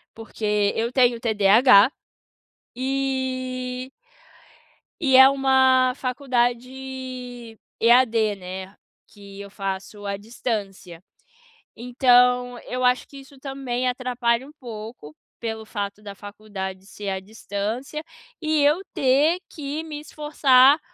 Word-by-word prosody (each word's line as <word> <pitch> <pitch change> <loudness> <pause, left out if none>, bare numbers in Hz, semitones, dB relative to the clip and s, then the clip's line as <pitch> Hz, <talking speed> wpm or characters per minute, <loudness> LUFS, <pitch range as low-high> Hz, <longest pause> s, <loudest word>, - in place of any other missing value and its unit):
porque 210 -2 -1
eu 230 +2 -1
tenho 245 -2 +3
TDAH. 220 +1 +5 0.9
E 260 -1 -3 1.1
E 265 -5 +4
é 265 0 +10
uma 260 -2 +3
faculdade 250 -2 -3 0.2
EAD, 230 -3 +4
né, 190 +1 -8 0.3
que 200 -1 -13
eu 200 - -9
faço 195 +1 -6
à 200 0 -2
distância, 200 -5 -5 0.7
então 245 0 +3
eu 255 0 -4
acho 250 0 +2
que 280 - -13
isso 275 0 -14
também 260 -2 -3
atrapalha 250 0 -1
um 295 - -13
pouco, 220 - -9 0.2
pelo 220 -1 -5
fato 205 -1 -5
da 200 -1 -9
faculdade 200 -2 -8
ser 205 -1 -6
à 190 - -2
distância, 220 +8 -5 0.4
e 310 -2 +1
eu 300 +6 +3
ter 285 +6 +3
que 300 +1 -5
me 305 -2 -7
esforçar 290 -2 +4
245 Hz, 110 wpm, -23 LUFS, 210-265 Hz, 1.1 s, é